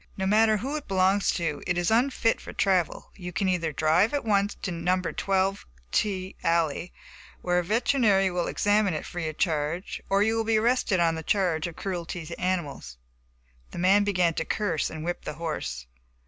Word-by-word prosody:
"No 190 - -1
matter 215 +2 +4
who 270 +8 -3
it 295 - -8
belongs 190 +1 +2
to, 160 -4 -2
it 180 -1 0
is 175 +3 +1
unfit 235 -1 +2
for - - -9
travel. 185 -4 0
You 180 -2 -7
can 190 +3 -1
either 170 -4 0
drive 160 - +2
at 285 - -2
once 205 -1 +1
to 190 - -2
No. 175 +2 0
12 195 +2 -1 0.3
T 190 -2 -1
alley, 165 0 0 0.5
where 180 0 +2
a - - -1
veterinary 210 -2 +2
will 175 -1 -1
examine 205 -3 +2
it - - -4
free 175 -2 -4
of 155 - -9
charge, 160 +1 -1
or 195 +1 +3
you 220 +1 +1
will 225 - +1
be 220 0 +2
arrested 230 -4 +2
on 165 -1 +1
charge 180 -5 +1
of 170 - -8
cruelty 175 -3 -4
to 170 - -8
animals." 150 - -3 0.7
The - - -10
man 190 +4 +4
began 180 -4 +2
to 160 - -2
curse 175 -3 -1
and 155 -1 -7
whip 175 0 -3
the - - -5
horse. 65 - -4
185 Hz, 190 wpm, -26 LUFS, 165-205 Hz, 0.7 s, matter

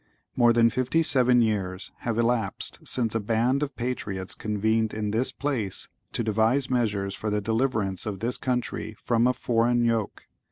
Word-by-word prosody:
(¶ - - -40
1) - - -40 0.3
More 120 -1 +5
than 115 0 +4
fifty 130 +7 +1
seven 125 -4 +4
years 95 -4 -2
have 115 -2 -2
elapsed 115 -4 0
since 115 -4 0
a 115 - +1
band 115 +6 +1
of 145 -3 -3
patriots 100 -7 -4
convened 110 +1 0
in 105 -1 -2
this 120 +4 0
place, 125 -10 -2 0.2
to - - -2
devise 115 +5 +1
measures 105 -6 0
for 105 - -4
the 105 0 0
deliverance 110 -3 -1
of 100 -3 -4
this 120 +4 -1
country 125 -3 -2
from 120 0 +2
a 125 - +3
foreign 120 0 +1
yoke. 115 -3 -1
115 Hz, 175 wpm, -26 LUFS, 105-125 Hz, 0.3 s, More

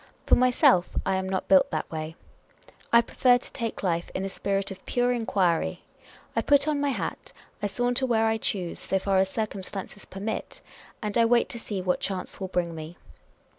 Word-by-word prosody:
For - - +2
myself, 245 -8 +5 0.2
I 190 - +1
am 190 0 -2
not 190 -1 -2
built 190 -1 +5
that 155 - -3
way. 160 0 -5 0.8
I 235 - +7
prefer 245 +1 +3
to - - -9
take 230 -3 -4
life 170 -2 0
in 190 - -1
a - - -2
spirit 195 0 -2
of 190 -1 -9
pure 245 0 +2
enquiry. 195 -8 0 0.5
I - - +2
put 285 0 +4
on 295 -2 +1
my 285 - +1
hat; 265 - -4 0.3
I 205 - +1
saunter 245 +5 0
where 225 -2 +3
I 225 0 +2
choose, 185 -5 -3
so 190 - 0
far 190 0 +1
as 190 0 +2
circumstances 200 -1 -5
permit; 205 +3 -5 0.4
and 210 -1 -2
I 230 - +6
wait 235 +1 +3
to 235 - -5
see 200 -4 -4
what 180 -1 +1
chance 190 0 -3
will 190 - -2
bring 175 -2 -1
me. 160 +1 -8
195 Hz, 195 wpm, -27 LUFS, 185-235 Hz, 0.8 s, I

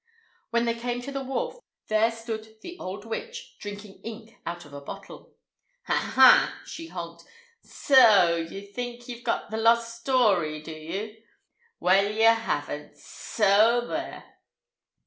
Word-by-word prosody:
When 235 0 +1
they 230 - +1
came 240 +1 -3
to 280 - -6
the 275 -1 -4
wharf, 480 - -3 0.3
there 215 +1 +3
stood 220 -1 -7
the 350 - -8
old 200 +3 -6
witch, 470 - -7
drinking 205 -1 -9
ink 225 0 -9
out 175 0 -5
of 145 - -15
a 140 - -8
bottle. 140 - -11 0.5
"Ha, - - -1 0.2
ha!" - - +7
she 330 - -8
honked. 170 - -8 0.4
"S - - -22
so 215 -11 +6
ye 170 +4 -6
think 240 +3 -7
ye've 240 -1 -8
got 235 -2 -2
the 220 - -2
lost 230 +1 +3
st 230 - -14
story, 200 - +2
do 160 - -8
ye? 200 +8 -6 0.6
Well, 195 +3 +3
ye 220 +1 0
haven't; 225 0 +1
s - - -22
so 220 +3 +2
there!" - - -5
225 Hz, 155 wpm, -26 LUFS, 195-240 Hz, 0.6 s, ha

